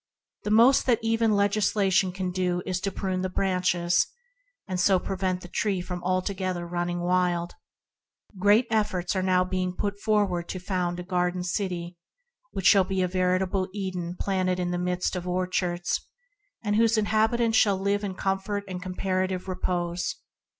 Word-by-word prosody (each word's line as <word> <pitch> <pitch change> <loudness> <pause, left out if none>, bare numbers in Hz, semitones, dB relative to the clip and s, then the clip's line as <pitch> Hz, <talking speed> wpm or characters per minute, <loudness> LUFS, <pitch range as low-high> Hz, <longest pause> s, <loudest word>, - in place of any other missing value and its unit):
The - - -1
most 235 +6 +5
that 240 -3 +4
even 225 -1 +2
legislation 200 -2 +2
can 185 0 -3
do 180 -1 -1
is 185 -1 -1
to 195 - -1
prune 185 -2 -2
the 185 - -1
branches, 180 -2 +1 0.6
and 185 -2 -2
so 190 +1 +4
prevent 185 0 -2
the 175 - -9
tree 195 +1 -1
from 180 0 -5
altogether 185 -1 -1
running 175 0 -2
wild. 175 -1 +1 0.9
Great 205 +5 +5
efforts 205 -5 0
have 185 -1 +1
been 185 -1 -1
put 200 +2 -3
forward 200 -5 +1
to 185 - -4
found 180 -1 -2
a 180 0 -1
city 180 -2 -3 0.5
that 190 - -5
shall 195 -2 +7
be 190 0 -1
a - - +1
veritable 185 +1 0
Eden 180 -3 -4
planted 185 -2 0
in 175 -1 -1
the 175 - -1
midst 180 +1 -1
of 180 0 -4
orchards, 180 -1 -1 0.6
whose 220 +2 +3
inhabi 215 +2 +2
tants 230 -2 +3
shall 200 -2 +3
live 200 +2 0
in 195 -2 -3
comfort 195 +2 -2
and 180 -1 -5
comparative 185 0 -2
repose. 175 -1 -2
185 Hz, 155 wpm, -26 LUFS, 180-200 Hz, 0.9 s, shall